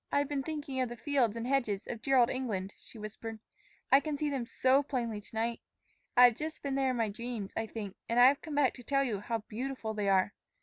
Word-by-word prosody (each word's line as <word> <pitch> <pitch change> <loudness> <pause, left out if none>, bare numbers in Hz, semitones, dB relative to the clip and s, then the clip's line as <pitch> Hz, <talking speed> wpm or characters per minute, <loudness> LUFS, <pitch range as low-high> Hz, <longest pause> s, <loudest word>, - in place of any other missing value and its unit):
"I've 285 0 +2
been 285 -1 -1
thinking 285 -2 -3
of 250 - 0
the 240 - -7
fields 245 -5 +1
and 230 - -3
hedges 240 -7 0
of 230 -2 -6
dear 270 +1 +3
old 240 -2 +5
England," 205 -7 -3
she - - -12
whispered. 220 +1 -7 0.5
"I 270 - +8
can 290 +1 -3
see 295 0 -1
them 255 -4 -2
so 260 +3 +3
plainly 240 -7 -3
to 210 - -14
night. 230 +1 -1 0.6
I 250 - +9
have 245 -1 +8
just 310 +4 -5
been 280 -1 -2
there 270 -1 +2
in 255 - -1
my 225 -2 +1
dreams, 225 -1 -5
I 225 - -1
think; 210 -4 -6
and 235 +1 +2
I 245 - +9
have 275 +2 +5
come 310 -2 -6
back 285 -3 +3
to 245 - -11
tell 275 +2 +2
you 225 -7 -1
how 225 +1 -3
beautiful 240 -1 -4
they 205 -2 0
are. 190 +1 +3
245 Hz, 250 wpm, -32 LUFS, 220-275 Hz, 0.6 s, I